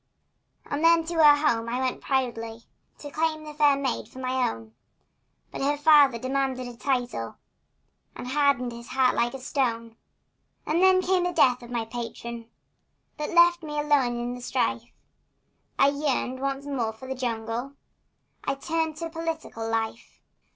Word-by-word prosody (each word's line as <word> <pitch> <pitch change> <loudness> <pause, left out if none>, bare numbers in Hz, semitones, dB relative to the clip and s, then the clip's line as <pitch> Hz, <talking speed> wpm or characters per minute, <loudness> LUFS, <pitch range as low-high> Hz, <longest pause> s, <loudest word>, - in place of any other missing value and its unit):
And 290 +2 -3
then 335 0 +5
to 340 - -4
her 300 -2 +6
home 230 -3 0
I 245 - -1
went 260 -1 -2
proudly 230 -4 -2 0.3
To 290 - -9
claim 310 0 -1
the 305 -1 -8
fair 295 -1 +4
maid 275 -1 -2
for - - -15
my 255 -1 0
own, 110 -1 -9 0.8
But - - -6
her 290 +2 +1
father 290 -4 +6
demanded 260 0 -2
a 245 - -9
title, 245 - -2 0.8
And - - -7
hardened 275 -3 +2
his 235 0 -10
heart 255 -1 +2
like 240 +2 0
a - - -6
stone. 230 -4 -2 0.7
And 325 +3 +1
now 375 0 +6
came 370 -1 +1
the 355 - 0
death 250 -7 +3
of 240 - -11
my 235 -2 -2
patron, 235 0 -7 0.7
That 300 - -3
left 345 0 +5
me 300 -2 -6
alone 275 -5 +2
in 240 +1 -3
the 250 - -8
strife, - - -1 0.9
And 280 +1 +3
yearning 260 -3 -1
once 275 0 -2
more 245 -6 -2
for 260 +4 -11
the 265 - -2
jungle, 240 +1 -3 0.7
I 275 - -1
turned 320 +2 -2
to 330 0 -4
political 320 -9 -4
life. 225 0 -3
265 Hz, 165 wpm, -26 LUFS, 240-300 Hz, 0.9 s, her